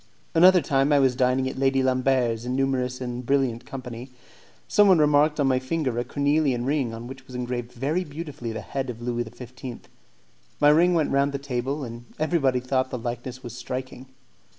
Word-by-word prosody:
Another 180 +2 +7
time, 135 +1 +2
I 145 - +5
was 130 -2 +3
dining 130 +1 +2
at 130 - -5
Lady 135 0 +2
Lambert's 130 -3 +1
in 125 +1 -2
numerous 130 -2 0
and 125 0 -4
brilliant 125 -2 0
company. 125 -1 -7 0.6
Someone 200 -3 +5
remarked 150 0 +3
on 145 - +3
my 130 -1 +3
finger 130 -2 -2
a - - 0
cornelian 140 -3 +1
ring 135 -4 0
on 115 +1 -7
which 130 +1 -10
was 125 - -10
engraved 125 -1 -4
very 145 +9 -1
beautifully 145 -6 -6
the 110 - -5
head 135 -2 -4
of 115 -2 -6
Louis 120 0 -2
XV. 125 +1 -9 0.8
My 145 - +6
ring 170 +4 +5
went 160 -3 +1
round 140 +1 +2
the - - -1
table, 135 +1 -3
and 120 -1 -8
everybody 150 -5 +1
thought 130 +1 0
that 125 - -4
the 115 - -10
likeness 120 +2 -5
was 120 -1 -7
striking. 130 +1 -6
130 Hz, 190 wpm, -25 LUFS, 125-140 Hz, 0.8 s, Another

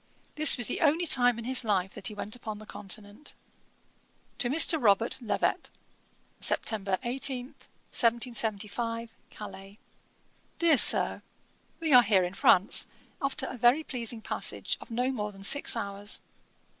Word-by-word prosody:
This 305 -2 +7
was 240 - -1
the - - -4
only 325 +2 +1
time 245 -6 +3
in 230 - -8
his 255 0 +3
life 190 -4 -2
that - - 0
he 215 - -4
went 210 +2 -5
upon 220 -3 -8
the 215 - -13
Continent. 205 +5 -8 1.0
'To 240 - +2
MR. 320 +2 +4
ROBERT 225 +4 +1
LEVET. 230 - -3 0.7
'Sept. - - +1 0.3
18, 250 +1 -1
1775. 230 -2 -3 0.2
Calais. 195 -1 -12 0.8
'DEAR 330 -4 +3
SIR, - - +6 0.6
'We 320 -3 -1
are 250 - +8
here 205 -5 +1
in 180 +1 -5
France, 195 0 +2 0.3
after 275 -1 -2
a - - -7
very 245 +7 +2
pleasing 235 -5 -5
passage - - -4
of - - -13
no 250 +3 -2
more 210 -5 -5
than 195 -1 -14
six 285 +7 +2
hours. 200 -2 -2
230 Hz, 145 wpm, -27 LUFS, 210-260 Hz, 1.0 s, are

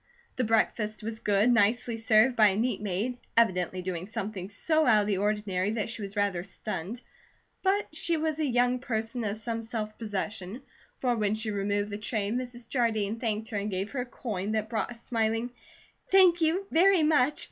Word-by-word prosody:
The 255 - 0
breakfast 215 -1 0
was 225 0 -4
good, 210 +4 +3
nicely 235 +1 +2
served 225 +3 +4
by 215 -2 +6
a 195 - +1
neat 230 0 0
maid, 210 +5 -2 0.2
evidently 185 -5 +2
doing 180 -1 -4
something 205 -4 -5
so 310 +8 +1
out 215 -3 +6
of 205 - -2
the 200 -3 0
ordinary 205 -2 0
that 225 0 -2
she 230 - -5
was 200 +1 -6
rather 200 -4 +1
stunned; 210 +3 -5 0.6
but 390 -4 0
she 335 +1 0
was 315 0 -1
a - - +1
young 245 0 +2
person 230 -1 -3
of 210 0 -2
some 230 +1 -3
self 220 -2 -4
possession, 210 +1 -4 0.3
for 245 -2 0
when 210 -1 +1
she 220 0 -1
removed 205 +1 -1
the 205 - -4
tray, 210 -1 -2
Mrs. 245 -1 -4
Jardine 225 -4 0
thanked 220 -1 -2
her 215 - -3
and 200 +1 -2
gave 195 +1 -3
her 275 - -3
a - - -4
coin 215 -4 -4
that 215 0 -1
brought 220 - -1
a 240 - -7
smiling: 230 0 -1 0.6
"Thank 365 -3 +6
you 335 +5 +2
very 360 +1 +5
much. 300 -2 +3
220 Hz, 190 wpm, -28 LUFS, 205-245 Hz, 0.6 s, by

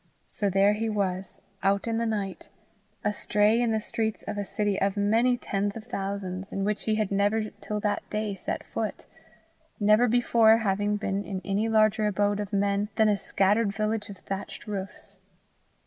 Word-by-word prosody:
So 205 - -1
there 195 +2 +4
he 220 +2 -1
was, 190 -3 -2 0.2
out 195 0 +2
in 230 -1 0
the 230 - 0
night, 205 -3 -3 0.5
astray 210 +2 +2
in 240 - +2
the 220 -1 +1
streets 220 0 -3
of - - -3
a 205 - -2
city 205 0 -1
of 200 +1 +1
many 225 +5 +3
tens 200 -2 -2
of 220 - -8
thousands, 195 -4 -4
in 195 - -2
which 210 0 -1
he 220 - +2
had 215 -2 -1
never 205 +2 +1
till 210 0 -3
that 210 0 -2
day 210 -1 -2
set 195 - -4
foot - - -4 0.7
never 215 +3 +5
before 230 -1 +5
having 205 -1 0
been 200 -1 -2
in 195 -2 -4
any 205 +3 0
larger 215 0 +3
abode 205 0 +1
of 205 -1 -4
men 200 0 +1
than 220 -1 +4
a 205 - +3
scattered 200 +2 +1
village 215 0 -1
of 200 - -8
thatched 195 +1 -6
roofs. 200 -1 -7
205 Hz, 180 wpm, -27 LUFS, 200-220 Hz, 0.7 s, never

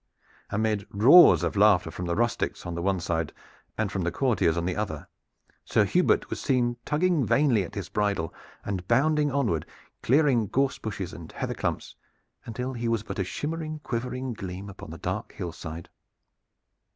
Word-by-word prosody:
Amid 105 -1 -1
roars 130 - +7
of - - -1
laughter 100 -3 +4
from 90 - -5
the 85 - 0
rustics 120 +1 -1
on 85 - -4
the 85 - -3
one 95 +1 +1
side 80 -2 -2 0.5
and 110 -2 -1
from 95 - -2
the 85 0 -1
courtiers 95 -7 +1
on 85 - -1
the 90 - -1
other, 105 -1 -4 0.6
Sir - - +2
Hubert - - +2
was - - -3
seen, 120 -2 +1
tugging 160 0 +2
vainly 125 -2 +3
at 85 - -9
his - - -4
bridle, 100 -6 -1 0.3
and 95 -3 -4
bounding 150 +4 +3
onward, 120 - 0 0.4
clearing 130 -5 +3
gorse 135 +6 0
bushes 95 -4 -5
and 85 -2 -10
heather - - -3
clumps, - - -3 0.5
until 125 +3 -4
he 120 -1 -3
was 115 -2 0
but 105 -2 -6
a - - +2
shimmering, 155 - -4
quivering 125 +1 -3
gleam 95 -1 -7
upon - - -11
the - - -8
dark - - -4
hillside. 85 -1 -7
105 Hz, 170 wpm, -27 LUFS, 90-130 Hz, 0.6 s, roars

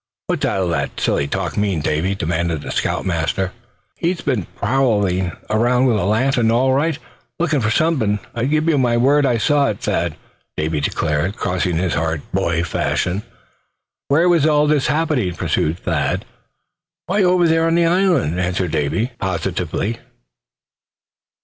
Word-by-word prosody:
"What's - - -2
all 95 -2 0
that 85 - -2
silly 70 - 0
talk 90 +2 -3
mean, 100 -5 0
Davy?" 80 +6 0
demanded 85 -2 -1
the - - -5
scout - - -1
master. 90 +1 -1
"Well, - - -26 0.4
he's 170 +1 -1
been 125 - -1
prowling 105 -7 +1 0.2
around 120 +4 +2
with 120 -4 +3
a 95 - -1
lantern, 115 +3 +2
all 130 +3 +3
right, 150 +2 +1 0.4
lookin' 155 -5 +1
for 110 - +1
something; 115 -6 +1 0.2
I 115 +1 -1
give 155 +3 +1
you 155 -4 +3
my 120 -2 +2
word 140 +4 +3
I 120 -2 +2
saw 145 +4 +2
it, - - -4
Thad," - - -1 0.4
Davy 75 0 -1
declared, 75 +6 -1
crossing 90 -1 -1
his 90 -1 0
heart, 80 -1 -1
boy 85 0 0
fashion. 90 +2 -1 0.9
"Where 160 +5 +3
was 170 -4 +4
all 150 -1 +3
this 150 -3 +2
happening?" 150 - 0
pursued 80 +2 0
Thad. 85 -6 -1 0.8
"Why, 200 +3 +1
over 180 -2 +4
there 165 0 +2
on 165 - +2
the 170 0 +3
island!" 170 - +2
answered 90 -1 -1
Davy, 80 - -1
positively. 100 +3 -2
110 Hz, 155 wpm, -19 LUFS, 90-145 Hz, 0.9 s, was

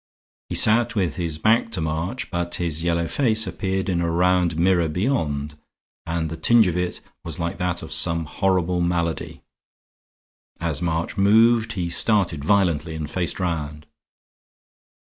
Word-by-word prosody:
He - - -3
sat 115 +1 +4
with 90 -7 -1
his 85 -4 -3
back 115 +7 +2
to - - -1
March, 80 +10 -3
but 85 -1 -1
his 85 -2 -2
yellow 85 0 0
face 110 - +2
appeared 95 +1 -3
in 90 -3 0
a 85 - 0
round 90 -1 +1
mirror 85 -1 +2
beyond 75 - -2 0.5
and 85 -1 -2
the 80 +1 -6
tinge 115 +7 +4
of 90 -2 -1
it 90 0 -3 0.2
was 85 -2 -5
like 85 +3 -4
that 90 -1 -2
of - - -9
some 80 0 +2
horrible 90 0 0
malady. 85 -1 -2 1.2
As 85 -2 -1
March 85 +2 -2
moved 115 +3 +4
he 90 -3 -3
started 85 -4 +2
violently 85 -4 +1
and 80 -1 -4
faced 85 +4 -2
round. 75 -4 -3
85 Hz, 150 wpm, -22 LUFS, 80-95 Hz, 1.2 s, sat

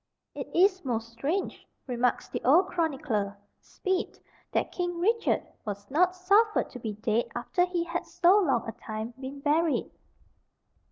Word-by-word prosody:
"It - - -6
is 375 +1 +4
most 230 -4 -2
strange," 290 +12 -3 0.2
remarks 245 -1 0
the - - -5
old 340 +9 +5
chronicler, 255 - -1 0.2
Speed, 375 -1 -3 0.3
"that - - 0
King 350 -1 -2
Richard 450 +6 +2 0.2
was 205 0 -6
not 360 +5 +3
suffered 405 +4 +3
to 250 - -8
be 220 -3 -4
dead 215 +2 0
after 355 +9 +1
he 355 -1 -1
had 340 +1 -4
so 370 +4 +5
long 270 - +1
a - - -2
time 220 +2 -6
been 275 +1 -7
buried." 310 +2 +1
300 Hz, 150 wpm, -28 LUFS, 235-360 Hz, 0.3 s, old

